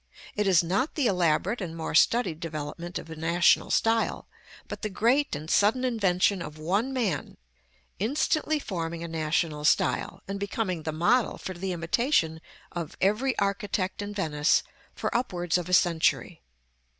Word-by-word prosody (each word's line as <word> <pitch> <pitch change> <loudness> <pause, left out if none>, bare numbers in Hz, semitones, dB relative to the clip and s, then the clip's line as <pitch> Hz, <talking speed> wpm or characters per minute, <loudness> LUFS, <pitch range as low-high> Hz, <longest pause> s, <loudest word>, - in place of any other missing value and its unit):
It 210 -1 0
is 180 -4 +5
not 195 - -1
the 290 - +1
elaborate 180 +2 +1
and 165 -3 -5
more 160 - -4
studied 175 -1 +3
developement 165 +2 -5
of 165 - -8
a - - -6
national 170 +2 +3
style, 225 0 +1 0.4
but - - -7
the 215 - -2
great 240 - +1
and 150 +2 -7
sudden 210 +9 +3
invention 200 -5 +1
of 155 -2 -7
one 195 +11 0
man, 215 - -2 0.6
instantly 305 - +1
forming 170 - -4
a - - -4
national 155 -1 -1
style, 150 - +1
and 200 0 -4
becoming 200 -4 -2
the 155 - -3
model 190 +10 +2
for 185 - -6
the 185 +2 -4
imitation 165 - 0 0.3
of 170 -3 -6
every 220 +7 +1
architect 200 -1 -1
in 205 0 -5
Venice 155 -6 +1 0.3
for - - -3
upwards 175 -9 -1
of 180 -1 -1
a - - -4
century. 170 -3 +2
185 Hz, 155 wpm, -27 LUFS, 165-215 Hz, 0.6 s, is